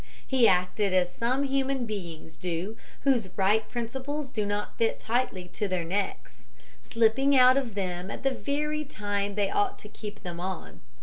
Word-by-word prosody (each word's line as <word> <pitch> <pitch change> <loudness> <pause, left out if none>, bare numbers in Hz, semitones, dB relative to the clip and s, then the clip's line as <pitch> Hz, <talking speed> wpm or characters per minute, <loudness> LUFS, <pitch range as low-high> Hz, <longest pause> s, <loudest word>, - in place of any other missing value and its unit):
He 255 -3 +5
acted 185 +2 +2
as 180 -1 +2
some 255 +4 +1
human 270 -2 0
beings 170 -7 -6
do 180 +5 -3 0.3
whose 245 -8 +2
right 205 +3 +3
principles 265 +4 -3
do 210 -2 -1
not 205 0 -2
fit 230 - +1
tightly 225 -6 -1
to 205 +3 -2
their 185 -2 -1
necks 195 +3 -3 0.3
slipping 255 +5 +3
out 255 0 +8
of 255 -6 -1
them 180 -1 -2
at - - -6
the 270 - +3
very 300 +3 -1
time 205 -6 -2
they 205 -2 +1
ought 405 -1 +1
to - - -10
keep 210 -1 -8
them 175 -2 -5
on. 185 0 -5
215 Hz, 170 wpm, -28 LUFS, 190-265 Hz, 0.3 s, out